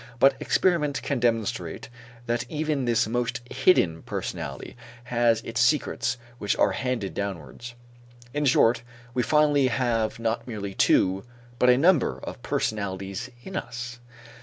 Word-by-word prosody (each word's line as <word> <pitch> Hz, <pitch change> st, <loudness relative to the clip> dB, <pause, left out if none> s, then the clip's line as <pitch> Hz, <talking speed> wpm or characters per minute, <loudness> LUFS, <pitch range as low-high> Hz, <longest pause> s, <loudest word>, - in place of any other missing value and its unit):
But 135 Hz, +3 st, +5 dB
experiment 150 Hz, -6 st, +1 dB
can 140 Hz, -3 st, -1 dB
demonstrate 115 Hz, -3 st, -1 dB, 0.4 s
that 120 Hz, 0 st, 0 dB
even 150 Hz, -3 st, -1 dB
this 115 Hz, -2 st, +2 dB
most 120 Hz, +1 st, -1 dB
hidden 85 Hz, -, +3 dB
personality -, -, -5 dB, 0.3 s
has 120 Hz, -1 st, +2 dB
still -, -, -8 dB
its 115 Hz, -, 0 dB
secrets 120 Hz, -2 st, +1 dB, 0.2 s
which 105 Hz, -, 0 dB
are -, -, +3 dB
handed 125 Hz, -6 st, -2 dB
downwards. 100 Hz, +5 st, -6 dB, 0.6 s
In 145 Hz, 0 st, 0 dB
short, 120 Hz, -3 st, +4 dB, 0.3 s
we 125 Hz, -, +1 dB
finally 145 Hz, +1 st, +3 dB
have 115 Hz, -3 st, 0 dB
not 115 Hz, +1 st, -2 dB
merely 100 Hz, -4 st, -5 dB
two 95 Hz, 0 st, +3 dB, 0.4 s
but 125 Hz, -, +5 dB
a 125 Hz, -, +6 dB
number 165 Hz, -1 st, +3 dB
of -, -, -7 dB
personalities 100 Hz, +3 st, -3 dB
in 190 Hz, -, -8 dB
us. 125 Hz, -7 st, -5 dB
120 Hz, 135 wpm, -26 LUFS, 110-135 Hz, 0.6 s, a